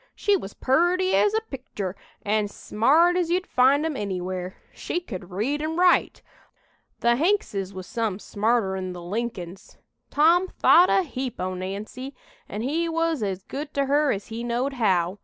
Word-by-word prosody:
She 410 -1 +2
was 200 - -5
purty 350 +7 +2
as 415 +1 +3
a 440 - +2
pictur' 210 -8 -5 0.3
an' 210 0 +1
smart 295 +13 +2
as 355 -2 0
you'd 360 +2 +1
find 270 +4 +3
'em 320 -3 -2
anywhere. 185 -3 -4 0.2
She - - -3
could 190 - -8
read 235 +11 -2
an' 315 +1 -2
write. 360 0 +3 0.8
The 235 0 +3
Hankses 275 - 0
was 185 -1 -8
some 225 -4 -2
smarter'n 200 -4 -1
the 175 - -8
Lincolns. 195 -2 -5 0.3
Tom 335 +5 +4
thought 360 0 +5
a 385 - +3
heap 260 -6 -5
o' 185 0 -2
Nancy, 205 +9 -6 0.3
an' 210 +3 -4
he 325 +6 0
was 330 -3 0
as 195 -2 -3
good 290 +6 -7
to 280 0 +2
her 290 +1 +2
as 200 0 -4
he 230 +1 -5
knowed 240 +3 -1
how. 190 -6 +1
240 Hz, 165 wpm, -25 LUFS, 195-320 Hz, 0.8 s, thought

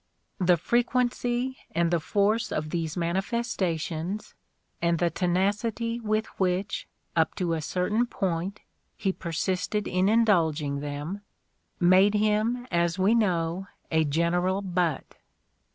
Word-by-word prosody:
The 180 -1 +4
frequency 245 +4 0 0.2
and 170 0 +2
the 170 - +3
force 210 +7 +1
of 155 0 -2
these 165 -1 -2
manifestations, 180 -1 -2 0.5
and 170 0 +2
the 170 0 +1
tenacity 210 +6 0
with 215 -1 0
which, 190 +1 0 0.3
up 160 -1 +2
to 175 -3 -1
a 160 - -1
certain 210 +9 0
point, 190 -1 -2 0.4
he 195 -3 0
persisted 185 +5 -2
in 185 +2 +2
indulging 165 -10 +2
in - - -5
them, 145 +7 -5 0.6
made 185 +4 +5
him, 215 +4 +1
as 170 0 +1
we 195 +4 +3
know, 180 -4 +1 0.2
a 160 -1 +3
general 175 +6 +1
butt. 175 -6 -1
185 Hz, 120 wpm, -27 LUFS, 170-210 Hz, 0.6 s, made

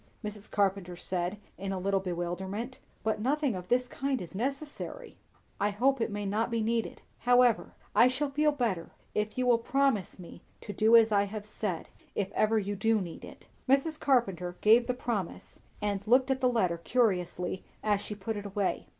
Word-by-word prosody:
Mrs. 210 0 -7
Carpenter 195 -3 0
said 180 +2 -2 0.2
in 195 0 -3
a 190 - -2
little 195 +1 +1
bewilderment; 190 +6 -4 0.2
"but 220 -1 0
nothing 280 +1 +1
of 180 -1 -6
this 250 +3 +2
kind 270 0 -2
is 180 -2 -8
necessary." 280 - -4 0.4
"I 205 - +2
hope 250 +5 +2
it - - +1
may 205 -1 -4
not 210 +4 0
be 230 -1 0
needed; 225 +1 -1 0.2
however, 245 -1 +3 0.2
I 245 - +7
shall 275 +3 -1
feel 300 +2 +3
better, 230 - -1 0.2
if 210 +2 -2
you 255 - +1
will 240 -2 +4
promise 265 -6 +1
me 180 -2 -11 0.2
to 205 - -6
do 220 +2 +5
as 225 -1 +7
I 200 -1 +4
have 205 +1 -6
said, 210 -5 -4 0.3
if 195 -2 -1
ever 220 +1 +2
you 205 -1 -1
do 225 +2 +2
need 175 -4 -6
it." - - -12 0.2
Mrs. 290 +4 +2
Carpenter 190 - +1
gave 230 +3 +6
the 250 - 0
promise, 225 -8 -4 0.2
and 200 -2 0
looked 260 +3 +4
at 265 0 0
the 255 - +4
letter 185 -8 +1
curiously 180 -4 0 0.2
as 205 -2 +2
she 210 - -6
put 210 +3 -4
it 205 0 -5
away. 200 -1 -1
215 Hz, 185 wpm, -30 LUFS, 195-250 Hz, 0.4 s, I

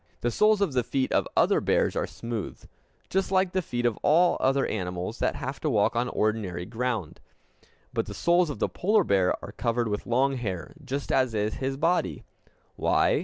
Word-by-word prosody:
The 120 - 0
soles 210 - +3
of 185 -8 +1
the 125 -1 +2
feet 130 +1 -1
of - - +2
other - - +4
bears - - +1
are - - -1
smooth, 110 +5 -6 0.4
just 190 0 -1
like 190 -1 +2
the 185 - 0
feet 120 -7 -3
of 120 -3 +1
all 170 +4 +4
other 135 +1 +2
animals 90 +2 -4
that - - 0
have 135 +2 -5
to 155 - -1
walk 110 -1 +2
on 120 +1 0
ordinary 105 -6 -1
ground. 115 -6 -3 0.7
But - - -1
the - - -7
soles 175 0 +3
of 145 - -4
the - - 0
polar 210 +2 +2
bear 95 - +2
are - - -9
covered 120 0 -1
with 105 0 -3
long 130 +3 +2
hair, 95 -9 -4
just 135 +1 -4
as 130 -4 +2
is 105 +1 0
his 135 0 -1
body. 170 +5 0 0.5
Why? - - +2
125 Hz, 195 wpm, -27 LUFS, 110-150 Hz, 0.7 s, other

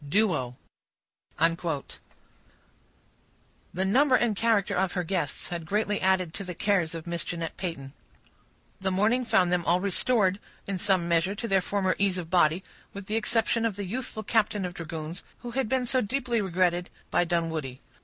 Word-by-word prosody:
—Duo. 145 - +1 0.8
The 165 -2 +1 2.0
number 260 +7 +4
and 235 -4 +2
character 220 -2 +2
of 185 0 +1
her 180 - -1
guests 170 -5 -2
had 170 -2 -5
greatly 205 +2 0
added 185 -3 +2
to 200 - -4
the 180 -2 -6
cares 175 -4 +1
of 165 - -6
Miss 170 -1 -2
Jeanette 165 -2 -4
Peyton. 140 -7 -5 0.9
The 190 0 0
morning 215 +7 +2
found 180 -5 +3
them 180 -1 +1
all 175 +2 +3
restored, 200 0 +2 0.3
in 195 -2 -3
some 185 -3 +2
measure, 170 +4 +2
to 230 +3 -4
their 195 -3 +3
former 190 0 0
ease 195 -2 +2
of 170 -2 -6
body, 175 0 +3 0.3
with 200 -1 -7
the 215 - -2
exception 225 +1 +1
of 225 -4 0
the 200 0 -4
youthful 220 +1 -4
captain 210 -2 +1
of 180 - -5
dragoons, 165 -1 -6 0.2
who 240 - -6
had 255 -2 -1
been 260 -1 +1
so 255 +1 +2
deeply 240 0 0
regretted 180 -2 +1 0.2
by - - +3
Dunwoodie. 160 -6 -2
185 Hz, 165 wpm, -27 LUFS, 170-210 Hz, 2.0 s, number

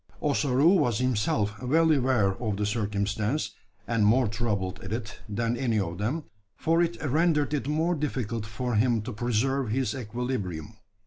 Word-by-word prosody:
Ossaroo 145 +4 +3
was 120 -8 +2
himself 105 -3 0
well 160 +6 +3
aware 130 -8 +3
of 105 -4 -1
the 105 - 0
circumstance 105 +4 -1 0.4
and 115 -2 +1
more 115 +4 +4
troubled 100 -4 -2
at 95 - -7
it 110 -2 -4
than 115 +3 0
any 120 -4 0
of 90 -2 -3
them 130 +10 -1 0.3
for 165 +1 +2
it 170 0 0
rendered 150 +1 +2
it 140 -2 -1
more 160 +4 +1
difficult 120 -8 -2
for 120 +4 -3
him 115 0 +2
to 125 +2 -5
preserve 120 +3 0
his 125 -1 0
equilibrium. 110 -6 -4
120 Hz, 155 wpm, -27 LUFS, 105-135 Hz, 0.4 s, more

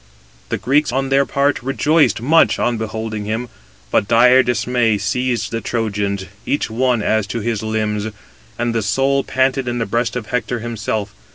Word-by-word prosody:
The - - -1
Greeks, 135 +7 +1
on 135 +1 -1
their 135 0 +3
part, 140 +1 +1
rejoiced 135 -1 +2
much 160 +5 +4
on 120 -2 0
beholding 110 -1 -4
him, 110 +3 -3 0.4
but 100 - +2
dire 125 +3 +6
dismay 120 -2 +1
seized 120 +4 -1
the 115 0 -2
Trojans, 100 -4 -2 0.2
each 140 -4 -1
one 120 -1 +1
as 110 -1 +1
to 110 +3 -3
his 115 -1 -2
limbs, 110 -1 -1 0.5
and 120 0 -1
the 115 - 0
soul 135 +7 +1
panted 130 0 0
in 120 0 -1
the 115 - -1
breast 115 +2 -1
of 125 -3 -3
Hector 125 0 -1
himself. 110 -3 -3
115 Hz, 170 wpm, -19 LUFS, 110-130 Hz, 0.5 s, dire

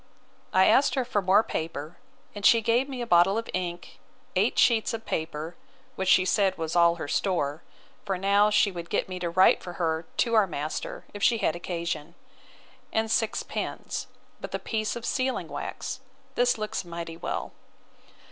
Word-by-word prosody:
I 190 0 +5
asked 280 +2 +4
her 260 -2 0
for 210 -4 0
more 190 +3 +4
paper; 160 -2 -5 0.3
and 205 - -8
she 230 - +7
gave 235 +5 +1
me 255 -3 -4
a - - -4
bottle 180 +1 +4
of 230 - -3
ink, 175 -1 -4 0.4
eight - - +2
sheets 230 -1 +3
of 225 - -9
paper, 160 +1 -4 0.4
which 190 -1 -1
she 185 - +5
said 190 0 +2
was 160 0 -3
all 170 -1 +5
her 160 - -6
store, 155 -3 -1 0.4
(for 195 -2 -2
now 200 +2 +4
she 210 -1 +3
would 170 -2 -7
get - - 0
me 185 -1 -6
to 175 -1 -2
write 185 +3 +5
for 175 - -7
her 160 -2 -1
to 235 - +1
our 215 -3 +5
master, 155 -2 -5
if 205 - -8
she 230 +3 +4
had 165 - 0
occasion,) 170 -2 -4 0.8
and 220 0 0
six 225 -1 +1
pens, - - -4 0.3
with - - -5
a - - +1
piece 215 -1 -2
of 235 -1 -6
sealing 260 0 -1
wax. - - -5 0.3
This 245 0 +2
looks 215 -2 -3
mighty 170 -1 -6
well. 165 - -4
185 Hz, 180 wpm, -27 LUFS, 170-220 Hz, 0.8 s, she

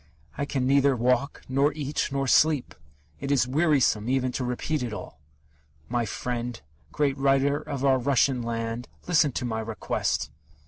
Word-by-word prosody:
I 140 - -2
can 135 -3 -1
neither 140 0 +4
walk, 125 +3 0
nor 140 +3 +2
eat, 145 -1 -2
nor 135 0 -1
sleep. 150 0 +3 0.5
It 140 - -4
is 130 -3 +3
wearisome 135 -6 +2
even 130 -1 +1
to 125 - -3
repeat 125 +4 -2
it 120 -3 -3
all! 105 - -8 0.7
My 120 -1 0
friend 120 +2 -4 0.3
great 145 -2 +1
writer 135 +1 +3
of 140 -1 -4
our 135 -1 +4
Russian 130 0 +2
land, 115 +1 -3 0.2
listen 160 -5 +3
to 125 - -2
my 110 -2 -2
request!... 110 -1 -2
130 Hz, 155 wpm, -26 LUFS, 120-140 Hz, 0.7 s, neither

